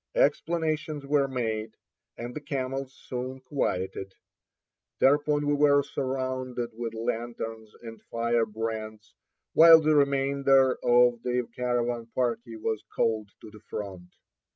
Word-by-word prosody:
Explanations 160 - 0
were 140 -1 +2
made, 110 -4 -3 0.4
and 120 +1 -6
the 150 - -5
camels 135 -2 -3
soon 130 +1 -5
quieted. 95 -8 -3 0.9
Thereupon 145 +1 +3
we 145 - +2
were 145 -1 +4
surrounded 130 -3 -3
with 115 0 -5
lanterns 115 -1 -4
and 115 -1 -9
firebrands, 115 -2 -2 0.4
while 165 0 +9
the 155 0 +2
remainder 140 -2 +3
of 120 -1 +4
the 125 -1 -1
caravan 120 -1 -1
party 120 -2 -1
was 110 -1 -2
called 110 -2 0
to 105 - -11
the 105 - -13
front. 95 -4 -7
125 Hz, 115 wpm, -27 LUFS, 115-140 Hz, 0.9 s, while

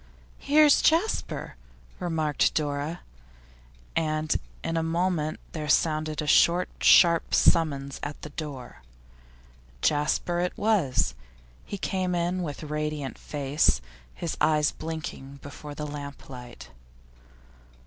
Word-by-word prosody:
'Here's 295 0 +5
Jasper,' 335 +8 +1 0.4
remarked 160 -4 0
Dora, 150 +2 -2 0.9
and 155 -1 0 0.3
in 165 - -2
a 165 - +1
moment 165 -1 -1
there 150 -2 -5
sounded 155 0 +1
a - - -4
short, 175 +4 +4
sharp 170 -2 +6
summons 140 -5 +2
at 145 0 -5
the 150 - -7
door. 140 - -7 1.0
Jasper 150 +4 +1
it 180 0 -2
was; 200 - +2 0.5
he 200 - -6
came 185 -2 -1
in 175 +2 0
with 150 -3 -5
radiant 150 -2 -3
face, 145 - +1 0.4
his 170 - -3
eyes 150 -1 +3
blinking 155 -4 -6
before 145 +1 -9
the 150 - -4
lamplight. 135 - -9
155 Hz, 105 wpm, -27 LUFS, 145-170 Hz, 1.0 s, sharp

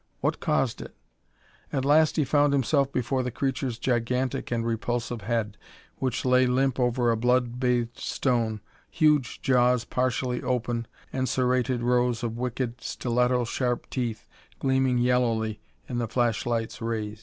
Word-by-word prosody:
What - - 0
caused - - 0
it? - - -10 0.8
At 135 -1 -1
last 155 +2 +4
he 155 - +2
found 145 +1 +3
himself 140 +1 +2
before 130 +1 0
the 125 - -2
creature's 130 -1 -2
gigantic 125 +1 -1
and 115 -1 -1
repulsive 120 0 -2
head 110 -1 -2 0.4
which 130 -2 -2
lay 125 0 +4
limp 130 +1 +1
over 125 -1 +2
a - - +2
blood 125 +1 +1
bathed 120 -2 0
stone, 115 -5 -1 0.3
huge 150 -6 +2
jaws 125 -2 +3
partially 125 -1 -1
open, 120 -2 -1 0.3
and 130 -1 -1
serrated 125 -1 +1
rows 125 0 +1
of 115 -1 -2
wicked, 125 0 -3
stiletto 125 0 +1
sharp 125 +1 -2
teeth 120 -4 -3 0.3
gleaming 130 -1 +2
yellowly 115 -3 +1 0.3
in 120 - -3
the 120 - -1
flashlight's 115 0 -1
rays. 110 -2 -3
125 Hz, 145 wpm, -26 LUFS, 115-130 Hz, 0.8 s, last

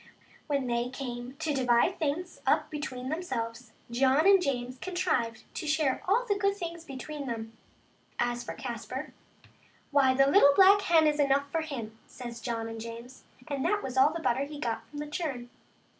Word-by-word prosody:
Well, 290 -2 +1
when 265 -2 -3
they 240 0 0
came 250 -1 -6
to 300 +2 -2
divide 255 +6 +2
things 325 +3 -2
up - - +2
between 260 -4 -5
themselves, 240 -8 -4 0.2
John 265 +5 +3
and 390 -1 +7
James 255 -4 -2
contrived 325 -12 -1
to 315 - -5
share 300 -3 +1
all 440 +6 +3
of - - -15
the 405 -2 +1
good 400 -1 +2
things 340 -2 -6
between 280 0 -7
them. 225 -1 -5 0.6
As 240 0 0
for - - -6
Caspar, 245 +3 -6 0.8
"why, 270 -2 +4
the 275 +1 +5
little 280 -1 +6
black 395 +1 +7
hen 330 -4 +4
is 300 -1 +2
enough 280 0 +2
for 325 - 0
him," 230 -8 -6
says 240 -2 -8
John 230 -2 -3
and 225 0 -6
James, 230 +3 -9 0.2
and 280 -3 -2
that 415 0 +1
was 260 -1 -5
all 265 +3 +5
the 335 - -4
butter 265 +1 +1
he 295 0 -8
got 225 -4 -3
from 290 - -10
that 295 0 -5
churn. 270 -8 -4
275 Hz, 190 wpm, -29 LUFS, 240-315 Hz, 0.8 s, and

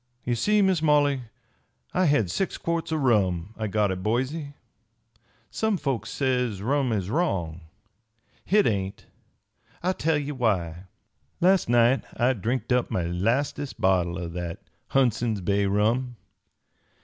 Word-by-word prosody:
"Ye 120 - 0
see, 210 - +2
Miss 190 -4 +2
Molly, 145 -3 +3 0.7
I 185 - +2
had 115 - +2
six 195 - -2
quarts 170 -1 -2
o' - - +1
rum 105 - +1
I 110 - -3
got 105 -1 +1
at 95 0 -4
Boise. 130 - -2 1.0
Some 220 -3 0
folks 130 - -2
says 125 -7 -1
rum 135 +1 +1
is 100 -3 -2
wrong. 90 - -1 0.8
Hit 205 +1 +3
ain't. 100 -1 -2 0.8
I'll 185 +1 +1
tell 160 -3 +1
ye 145 0 -3
why. 95 - -1 0.5
Last 185 -5 +3
night 120 +2 +4
I 125 +2 +3
drinked 120 +4 -3
up 125 -1 +1
my 90 - -1
lastest 115 +11 -1
bottle 90 -2 +2
o' 90 -2 -4
that 85 -1 -6 0.3
Hundson's 120 -4 +1
Bay 100 +2 +1
rum. 115 +5 +1
120 Hz, 135 wpm, -26 LUFS, 100-145 Hz, 1.0 s, night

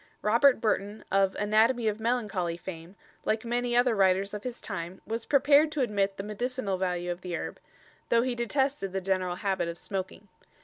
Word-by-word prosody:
Robert 235 +5 +5
Burton, 210 -1 -1
of 195 0 +3
"Anatomy 220 +3 +2
of 215 0 0
Melancholy" 210 -8 -1
fame, 175 0 -9 0.3
like 220 +2 -1
many 240 +1 0
other 245 -1 +4
writers 195 0 +2
of 210 - -5
his 245 -1 -5
time, 180 -2 -6
was 225 +1 -4
prepared 285 +2 +5
to 295 - 0
admit 200 -4 0
the 195 - -4
medicinal 210 -1 -2
value 180 -1 -1
of 175 +1 -6
the 180 -2 -4
herb, - - -6 0.5
though 235 0 +4
he 255 -1 -1
detested 240 -3 -1
the 195 - 0
general 185 -1 0
habit 190 -2 -1
of 170 0 -5
smoking. 195 +2 -5
210 Hz, 180 wpm, -28 LUFS, 190-240 Hz, 0.5 s, Robert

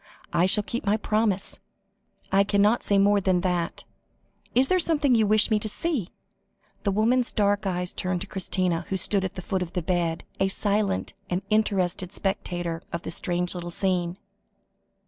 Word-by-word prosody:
"I 180 - +3
shall 210 +2 +3
keep 235 +4 -4
my 210 +1 +2
promise. 215 -3 0 0.7
I 195 +1 +5
cannot 205 +3 +2
say 200 - +1
more 200 +1 +4
than 185 -2 +2
that. 175 -2 -2 0.7
Is 255 +2 +6
there 370 +4 +2
someone 305 -6 +2
you 220 -3 +3
wish 215 +2 +4
me 215 - +3
to 215 - -2
see?" 270 - -2 0.7
The 205 - 0
woman's 235 +5 +2
dark 205 -2 +1
eyes 180 -1 +1
turned 180 -1 -2
to - - -5
Christina, 180 -3 -1
who 190 - -1
stood 195 +1 +2
at 190 - -4
the 185 - -6
foot 190 +1 -2
of 180 0 -5
the 180 - -2
bed, 170 -2 -1 0.2
a 195 - +3
silent 200 0 0 0.2
and 180 +2 -1
interested 190 -4 +1
spectator 175 -4 -3
of 170 - -4
the - - -5
strange 175 0 -1
little 175 -1 -6
scene. 180 -1 0
195 Hz, 175 wpm, -25 LUFS, 180-210 Hz, 0.7 s, Is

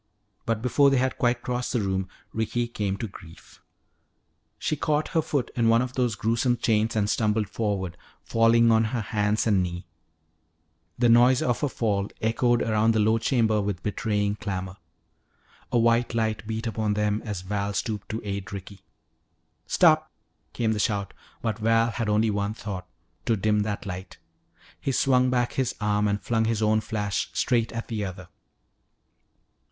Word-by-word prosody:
But 115 -1 -1
before 140 +3 +4
they 135 - +2
had 130 +1 0
quite 120 0 +1
crossed 125 0 -2
the 120 - +2
room 95 -2 -1 0.3
Ricky 120 +2 -1
came 100 -4 -2
to 115 - -4
grief. 85 -4 -15 1.0
She 155 - -1
caught 150 +1 0
her 165 - +2
foot 140 -5 -2
in 115 -2 +3
one 115 +2 +4
of 125 0 -5
those 125 -4 0
gruesome 115 +3 +1
chains 110 0 +1
and 105 -2 +1
stumbled 105 -1 +1
forward, 100 -4 -2 0.3
falling 115 - +4
on 110 0 +4
her 115 +1 -2
hands 105 0 0
and 100 -4 +3
knee. 90 0 -4 1.1
The 120 - +3
noise 120 +2 +5
of 120 -1 0
her 145 - +2
fall 100 -5 -1
echoed 120 +2 +2
around 110 0 +2
the - - +3
low 110 +2 +3
chamber 110 -3 +2
with 100 -3 -3
betraying 105 -1 -1
clamor. 95 -3 -4 0.9
A - - +2
white 115 +1 +2
light 110 -1 -1
beat 110 +1 -3
upon 110 -2 -1
them 105 0 0
as 105 -4 -4
Val 100 +1 -2
stooped 105 0 -3
to 110 - -3
aid 100 -2 -4
Ricky. 100 0 -8 0.9
"Stop!" 155 -3 +4 0.4
came 115 -2 0
the 110 - -1
shout, 100 -2 -1 0.3
but 110 -1 -1
Val 115 +1 +3
had 115 -2 -2
only 110 +1 +2
one 100 +1 -2
thought, 95 -5 -6 0.4
to 115 - +2
dim 105 +2 +2
that 105 -1 -2
light. 90 -1 -7 0.6
He 135 - -1
swung 130 -1 +3
back 125 -1 0
his 130 -2 -1
arm 105 0 +1
and 100 0 0
flung 115 +1 0
his 110 -1 0
own 110 0 +3
flash 105 -4 -2
straight 115 -2 +1
at 115 0 -5
the 110 -3 -3
other. 95 -2 -7
110 Hz, 170 wpm, -26 LUFS, 105-120 Hz, 1.1 s, noise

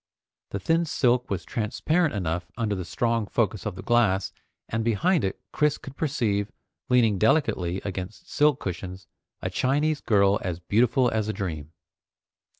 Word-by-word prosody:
The 100 - -3
thin 165 - +2
silk 125 -5 +1
was 90 -3 -3
transparent 145 +7 0
enough 85 -2 -2
under 110 -4 0
the 95 -2 -3
strong 115 +1 0
focus 105 -3 0
of 100 - -4
the 95 - -8
glass, 100 -5 +2 0.3
and 115 0 -1
behind 155 - +2
it 95 - -2
Chris 150 -2 +2
could 135 - -11
perceive, 105 -10 0 0.4
leaning 115 -6 +4
delicately 95 - +2
against 100 - -6
silk 150 -2 +3
cushions, 95 +1 -5 0.4
a - - -2
Chinese 145 +3 +1
girl 100 -2 +3
as 90 -2 -3
beautiful 120 +7 +2
as 110 -1 0
a 110 - -1
dream. 80 -7 -5
110 Hz, 150 wpm, -26 LUFS, 95-130 Hz, 0.4 s, leaning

